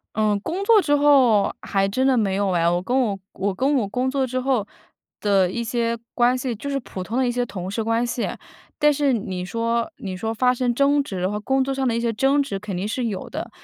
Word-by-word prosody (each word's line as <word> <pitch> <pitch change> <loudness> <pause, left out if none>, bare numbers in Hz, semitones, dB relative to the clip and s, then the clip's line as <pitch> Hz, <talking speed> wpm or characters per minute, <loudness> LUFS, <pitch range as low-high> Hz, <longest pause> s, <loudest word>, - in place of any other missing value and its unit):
嗯， 215 -1 +2
工 360 - -3
作 430 -1 +5
之 290 -3 +2
后， 270 -8 +4
还 195 -1 0
真 255 +7 0
的 265 -1 +4
没 205 -5 +1
有 200 0 0
哎。 170 -2 +2
我 175 +1 +1
跟 250 +7 0
我 210 -6 0 0.2
我 200 0 -1
跟 270 +8 +1
我 235 -6 +1
工 250 +5 -1
作 270 -1 0
之 255 +1 -2
后 255 -5 0 0.5
的 195 -3 +3
一 235 +5 -3
些 235 0 -1 0.2
关 245 +1 +3
系， 255 -1 -3
就 280 - -6
是 275 -1 -1
普 195 - -8
通 225 +5 -4
的 260 -1 +2
一 - - +1
些 245 0 -1
同 185 -4 -6
事 220 +2 -2
关 230 +1 +1
系。 240 0 -2 0.5
但 295 - +6
是 285 -1 +1
你 190 -6 -3
说 230 - -1
你 190 -2 -5
说 220 +4 -3
发 250 +3 +2
生 245 -1 0
争 280 +3 +3
执， 185 -6 -2
和 210 +1 -2
工 265 +5 +1
作 270 +1 -1
上 270 0 -1
的 235 - +1
一 230 - 0
些 235 0 0
争 275 +5 +3
执 205 -8 -4
肯 205 -1 -6
定 190 +4 -2
是 245 +3 -2
有 205 -5 -4
的。 - - -6
235 Hz, 270 characters per minute, -22 LUFS, 205-265 Hz, 0.5 s, 但